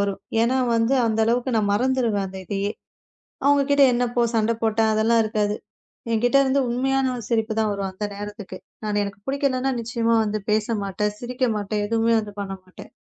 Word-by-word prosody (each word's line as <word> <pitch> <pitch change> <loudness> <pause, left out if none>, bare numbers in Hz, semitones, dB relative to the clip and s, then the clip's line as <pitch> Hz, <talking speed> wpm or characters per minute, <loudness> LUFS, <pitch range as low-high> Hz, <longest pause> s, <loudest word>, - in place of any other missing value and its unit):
வரும். 200 -1 -1 0.2
ஏன்னா 250 +3 +2 0.2
வந்து 230 +3 +2
அந்த 220 0 0
அளவுக்கு 240 +1 0
நான் 205 -2 +1
மறந்துருவேன் 235 -4 +1
அந்த 190 - -8
இதையே. 200 +2 -2 0.7
அவங்க 285 0 +5
கிட்ட 285 0 +6
என்ன 245 +1 +1
போ 240 - +3
சண்டை 225 +1 +2
போட்டேன். 220 0 +2
அதெல்லாம் 225 +1 +3
இருக்காது. 210 -1 0 0.6
என்கிட்ட 245 +4 +3
இருந்து 270 +1 +2
உண்மையான 265 +2 +1
ஒரு 235 - -6
சிரிப்பு 225 -1 0
தான் 220 - +1
வரும் 200 -1 -3
அந்த 210 +3 -4
நேரத்துக்கு. 205 -2 -7 0.3
நான் 205 -1 0
எனக்குப் 200 0 -8
புடிக்கலைன்னா 270 -1 0
நிச்சயமா 230 0 0
வந்து 215 -1 -2
பேசமாட்டேன். 210 -1 -1
சிரிக்கமாட்டேன். 225 -5 -1
எதுவுமே 230 +1 +2
வந்து 210 -2 -7
பண்ண 195 - -5
மாட்டேன். 185 0 -13
225 Hz, 170 wpm, -23 LUFS, 205-245 Hz, 0.7 s, கிட்ட